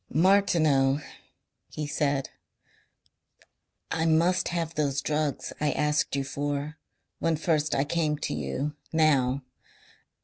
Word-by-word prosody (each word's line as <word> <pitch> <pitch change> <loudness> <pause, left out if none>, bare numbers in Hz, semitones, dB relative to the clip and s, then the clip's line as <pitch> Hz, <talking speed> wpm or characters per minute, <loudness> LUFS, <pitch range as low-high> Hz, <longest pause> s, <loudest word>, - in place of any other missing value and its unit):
"Martineau," 155 -6 +3 0.7
he 150 - -4
said, 145 -2 -1 1.6
"I 160 0 0
must 170 +3 +3
have 170 -2 -2
those 145 -3 0
drugs 150 0 -2
I 150 -2 +2
asked 150 -1 +1
you 140 - 0
for 145 +3 -3 0.4
when 165 -1 +1
first 155 -1 0
I 135 - +2
came 150 0 0
to - - -3
you 75 - -3 0.2
now. 140 -4 +2
150 Hz, 110 wpm, -27 LUFS, 140-160 Hz, 1.6 s, Martineau